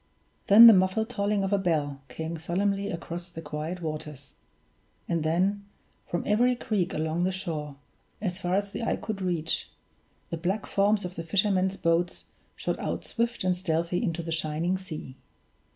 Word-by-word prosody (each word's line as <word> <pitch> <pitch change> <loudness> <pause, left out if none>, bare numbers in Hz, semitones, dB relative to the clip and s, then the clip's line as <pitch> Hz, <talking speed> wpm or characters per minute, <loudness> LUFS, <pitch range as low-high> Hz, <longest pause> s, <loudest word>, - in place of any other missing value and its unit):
Then 215 +4 +10
the 230 - +12
muffled 190 +4 +2
tolling 205 -3 0
of 195 +1 0
a 200 - +3
bell 150 -6 0
came 160 +5 -5
solemnly 195 +4 0
across 170 0 -5
the 170 - -9
quiet 160 +3 -5
waters; 150 -3 -6 0.7
and 170 -1 0
then, 185 +6 +1 0.4
from 175 - -2
every 245 +4 +3
creek 205 -6 -1
along 160 +2 -1
the 185 - +2
shore, 160 -6 -4 0.4
as 185 -3 -3
far 180 -1 0
as 200 0 -1
the - - -5
eye 230 - +1
could 210 -3 -5
reach, 170 -3 -1 0.6
the 170 - -2
black 185 +5 -1
forms 205 0 +2
of 180 - -5
the 165 - -5
fishermen's 190 +1 +1
boats 170 0 0 0.3
shot - - -2
out - - -3
swift 235 -2 -1
and 185 -1 +2
stealthy 170 -1 0
into 170 -5 -1
the 165 - -5
shining 160 +3 0
sea. 155 -8 -7
180 Hz, 170 wpm, -28 LUFS, 165-200 Hz, 0.7 s, the